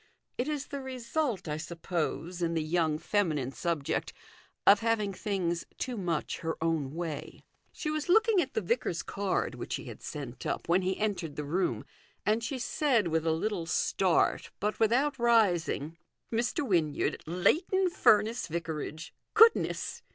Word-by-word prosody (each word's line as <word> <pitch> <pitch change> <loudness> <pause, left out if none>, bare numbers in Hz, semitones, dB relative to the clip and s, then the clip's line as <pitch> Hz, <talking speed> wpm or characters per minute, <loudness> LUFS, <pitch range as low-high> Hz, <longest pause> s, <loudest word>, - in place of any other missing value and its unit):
It 250 - -2
is 295 -2 -2
the 280 -1 -4
result, 255 - -2
I 150 0 -2
suppose, 170 +1 -3
in 165 -1 0
the 160 - +1
young 160 -1 +1
feminine 155 -9 0
subject 145 +3 -2 0.5
of 200 +1 +8
having 220 -3 0
things 180 -4 -1
too 250 - -3
much 175 -7 -2
her 160 0 -3
own 160 -4 -1
way. 165 -3 -5 0.3
She 305 - -3
was 310 +2 -3
looking 440 0 +5
at 270 -4 -5
the 220 - +1
vicar's 195 -3 -1
card, 200 -2 -1
which - - -4
he - - -7
had - - -9
sent 135 -4 -7
up, - - -3
when 175 +3 +3
he 185 0 -1
entered 185 -8 -2
the 150 - -3
room, 170 +7 -1 0.4
and 220 +2 +2
she 260 +4 -2
said, 240 - +1
with 160 0 0
a - - +4
little 170 +1 -1
start, 180 +2 +2
but 210 +3 -1
without 255 +5 +2
rising 175 -9 +2 0.2
" - - -45
Mr. 240 +5 0
Wynyard, 160 -7 +1
Leighton 345 - +2
Furness 220 - +3
Vicarage. 160 0 -5 0.2
Goodness 450 +1 +4
190 Hz, 160 wpm, -30 LUFS, 165-235 Hz, 0.5 s, of